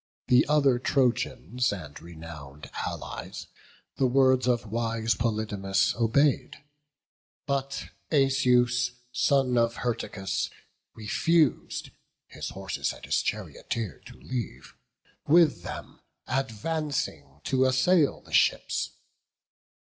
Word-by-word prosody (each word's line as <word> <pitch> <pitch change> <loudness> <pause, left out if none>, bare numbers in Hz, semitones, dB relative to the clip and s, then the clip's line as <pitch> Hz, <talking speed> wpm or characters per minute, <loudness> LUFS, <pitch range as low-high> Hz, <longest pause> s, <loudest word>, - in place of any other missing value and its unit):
The 125 -1 +5
other 140 -4 +4
Trojans 125 - +1
and 75 -8 -7
renown'd 80 -4 -10 0.2
Allies - - -6 0.5
The 135 - +3
words 130 0 +4
of 120 -2 +2
wise 115 +1 0
Polydamas 105 -4 0
obey'd: 120 +5 +2 0.9
But 140 -1 -2 0.2
Asius, 125 -3 +3 0.2
son 130 -2 +2
of 115 0 +2
Hyrtacus, 100 -4 -2 0.5
refus'd 155 +8 +1 0.3
His - - -6
horses 95 -1 -3
and - - -11
his - - +1
charioteer 110 -9 -4
to - - -13
leave, 100 - -6 0.5
With 165 -1 +5
them - - -8 0.3
advancing 135 - -2
to 130 -1 +2
assail 140 +5 +3
the - - -15
ships. - - +2
125 Hz, 95 wpm, -27 LUFS, 105-135 Hz, 0.9 s, The